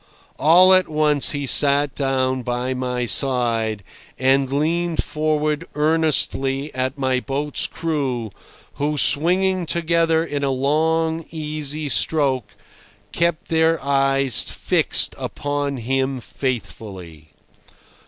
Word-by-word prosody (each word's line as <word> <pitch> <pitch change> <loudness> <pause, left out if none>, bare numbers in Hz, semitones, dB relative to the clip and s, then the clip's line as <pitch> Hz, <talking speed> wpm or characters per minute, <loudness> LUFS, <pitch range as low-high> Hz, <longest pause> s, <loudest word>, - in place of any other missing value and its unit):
All 180 +5 +6
at 185 -2 +3
once 150 -2 +2
he 145 -1 -3
sat 140 +1 +4
down 130 -2 -1
by 125 +1 -2
my 125 -1 -2
side, 115 -5 0 0.3
and 135 +1 +2
leaned 165 +4 0
forward 150 0 -1
earnestly 150 -2 0
at 130 +1 -2
my 130 -2 0
boat's 145 +3 -2
crew, 135 -9 -3 0.5
who, 150 +1 0
swinging 180 +5 +2
together 165 -1 +1
in 145 -3 -4
a 140 - +1
long, 160 +4 0
easy 155 -1 -4
stroke, 135 -5 0 0.6
kept 170 -1 -1
their 160 0 +2
eyes 135 -2 +2
fixed - - +1
upon 145 -1 -3
him 130 +2 -1
faithfully. 95 - -6
140 Hz, 105 wpm, -21 LUFS, 130-160 Hz, 0.6 s, All